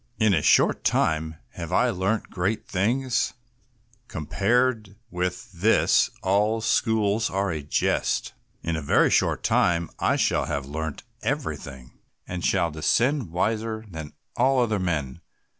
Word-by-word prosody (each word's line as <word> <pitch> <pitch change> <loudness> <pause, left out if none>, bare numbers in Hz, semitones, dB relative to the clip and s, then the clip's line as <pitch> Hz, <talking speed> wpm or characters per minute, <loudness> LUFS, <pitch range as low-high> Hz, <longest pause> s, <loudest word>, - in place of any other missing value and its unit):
In 110 -3 +3
a 80 - +2
short - - +3
time 80 0 +1 0.2
have - - -7
I - - +3
learnt 95 +4 -1
great 95 +4 -2
things; 120 +7 0 0.7
compared 105 - 0 0.2
with 90 +1 -3
this 100 +5 +3
all 105 +4 +2
schools 110 -1 +1
are 95 0 -1
a 80 -2 -3
jest; 70 - 0 0.3
in 85 - -1
a 80 - -3
very 70 - +3
short - - +2
time 85 -1 +2
I - - +2
shall - - +1
have 70 -2 -3
learnt 80 +1 -5 0.2
everything, 65 -3 -5 0.3
and 90 -1 -5
shall 85 -3 +1
descend 120 - +1
wiser 110 +5 -2
than 80 -3 -7 0.2
all 130 +2 +3
other 110 -4 +1
men. 80 -5 -2
95 Hz, 135 wpm, -25 LUFS, 80-110 Hz, 0.7 s, In